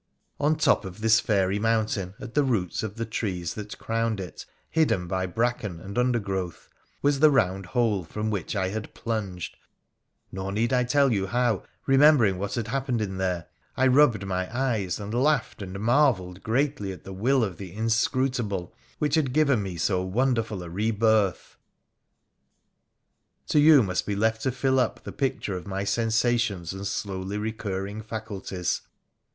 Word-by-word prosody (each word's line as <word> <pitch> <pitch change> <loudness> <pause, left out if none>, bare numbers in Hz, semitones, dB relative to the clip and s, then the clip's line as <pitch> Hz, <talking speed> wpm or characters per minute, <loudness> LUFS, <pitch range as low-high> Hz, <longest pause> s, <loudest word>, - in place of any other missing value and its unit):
On 150 +2 +3
top 150 -6 +3
of 95 +2 -9
this 110 0 +5
fairy 100 -3 +1
mountain, 105 -4 0
at 115 - -8
the 145 - +3
roots 110 -10 0
of 110 -2 -5
the 115 0 -3
trees 90 -7 -3
that 105 -1 -7
crowned 115 -2 -1
it, 90 -4 -8 0.2
hidden 155 - +1
by 95 +1 -1
bracken 110 -3 -1
and 100 +3 -8
undergrowth, 100 -8 -1 0.4
was 145 -1 +3
the 155 +1 +7
round 95 -8 +1
hole 105 -2 +1
from 105 +7 -3
which 100 0 -3
I 95 -2 0
had 110 +2 -6
plunged; 100 -6 -4 0.7
nor 95 +1 -4
need 115 +5 0
I 125 -1 +3
tell 140 0 +3
you 100 -2 0
how, 120 -2 +1 0.2
remembering 135 -8 +5
what 100 +1 -3
had 115 -2 -3
happened 130 -1 -1
in 95 -3 -3
there, 90 -3 -1 0.3
I 130 - +3
rubbed 130 -6 +4
my 95 -1 -2
eyes, 115 -8 -1
and 105 +1 -6
laughed 135 -2 +1
and 95 0 -6
marvelled 110 -7 +2
greatly 120 -3 0
at 95 - -10
the 95 - -8
will 125 +7 +2
of 95 -6 -3
the 95 -2 -8
Inscrutable, 115 -2 0 0.2
which 150 -2 -1
had 145 -6 +2
given 140 -7 +3
me 95 -3 -5
so 90 +3 +1
wonderful 110 0 0
a 85 - -8
re 105 +5 0
birth. 110 -3 +1 1.9
To 150 - +4
you 145 -3 +7
must 90 -3 -2
be 100 - -1
left 110 +2 +1
to 130 - 0
fill 130 +1 +1
up 125 - -1
the - - -6
picture 130 -7 -2
of 90 - -7
my 95 0 -2
sensation3 110 -4 +1
and 95 +1 -5
slowly 95 0 -3
recurring 105 -1 -4
faculties. 105 -5 -4
110 Hz, 170 wpm, -26 LUFS, 95-125 Hz, 1.9 s, the